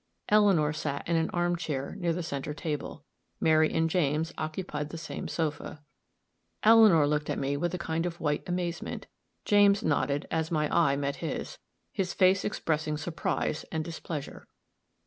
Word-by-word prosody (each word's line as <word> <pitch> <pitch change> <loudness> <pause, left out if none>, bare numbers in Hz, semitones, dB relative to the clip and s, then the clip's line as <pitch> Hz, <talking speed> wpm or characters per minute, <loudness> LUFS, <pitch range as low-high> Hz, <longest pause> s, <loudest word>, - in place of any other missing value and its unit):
Eleanor 195 -8 +4
sat 145 -2 -4
in 170 - +1
an 160 0 +1
arm 175 0 0
chair 145 -4 -4
near 175 -2 0
the 170 +1 -2
center 145 -1 -4
table; 150 -3 -5 0.3
Mary 155 0 +4
and 165 0 +2
James 160 -2 0
occupied 155 -2 -4
the 165 - -7
same 165 - -6
sofa. 150 -2 -3 0.8
Eleanor 215 -8 +7
looked 150 0 -1
at - - -1
me 140 +1 -1
with 175 +4 -1
a - - -3
kind 165 0 -2
of 170 -1 -6
white 150 -2 0
amazement; 175 -1 -3 0.4
James 205 -1 +5
nodded 145 -1 0
as 160 -1 0
my 155 -3 +1
eye 160 -5 +4
met 140 0 -2
his, 160 -5 -5 0.3
his 185 -2 -2
face 185 0 +4
expressing 155 -6 -1
surprise 160 -1 -2
and 160 -1 -2
displeasure. 160 -3 -6
160 Hz, 160 wpm, -29 LUFS, 150-175 Hz, 0.8 s, Eleanor